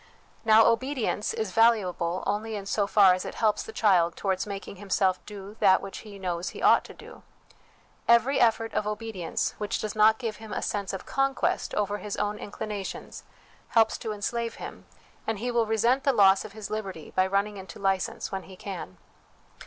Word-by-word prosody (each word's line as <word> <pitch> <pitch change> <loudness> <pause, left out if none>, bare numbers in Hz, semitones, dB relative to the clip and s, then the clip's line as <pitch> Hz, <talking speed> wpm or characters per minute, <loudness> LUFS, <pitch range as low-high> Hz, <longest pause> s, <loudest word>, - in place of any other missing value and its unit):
Now, 220 0 +6
obedience 250 -3 0
is 220 -4 -3
valuable 185 -6 +2
only 215 +2 -2
in 200 -2 -5
so 200 0 0
far 200 -3 +6
as 185 - -2
it - - -6
helps 215 -2 +1
the 445 - -8
child 180 - +3
towards 190 0 -1
making 200 -1 -7
himself 190 -1 0
do 205 0 -9
that 190 -3 +5
which 195 - -7
he 210 -2 -11
knows 180 -2 -3
he - - -9
ought - - +6
to - - -11
do. - - -13 0.9
Every 235 +4 +4
effort 225 -1 +2
of 210 - -1
obedience 210 -4 -3
which 210 -1 -1
does 215 0 -4
not 215 +1 +5
give 225 -3 -4
him 220 -1 -9
a - - -2
sense 200 -2 -2
of 195 - -6
conquest 270 -1 0
over 205 0 -1
his 210 -1 -5
own 210 0 -1
inclinations, 205 -1 -6 0.4
helps 225 -1 +3
to 225 - -4
enslave 230 +3 -3
him, - - -9 0.4
and 225 -1 -1
he 245 +4 -2
will 235 -2 +1
resent 235 +5 +2
the 275 - +3
loss 195 -3 +5
of 200 - -10
his 215 -2 -8
liberty 195 -7 -5
by 185 0 +2
running 200 +2 0
into 190 0 -9
license 195 -1 -1
when 195 -1 -3
he 190 - -12
can. 185 - -7
210 Hz, 190 wpm, -27 LUFS, 195-225 Hz, 0.9 s, Now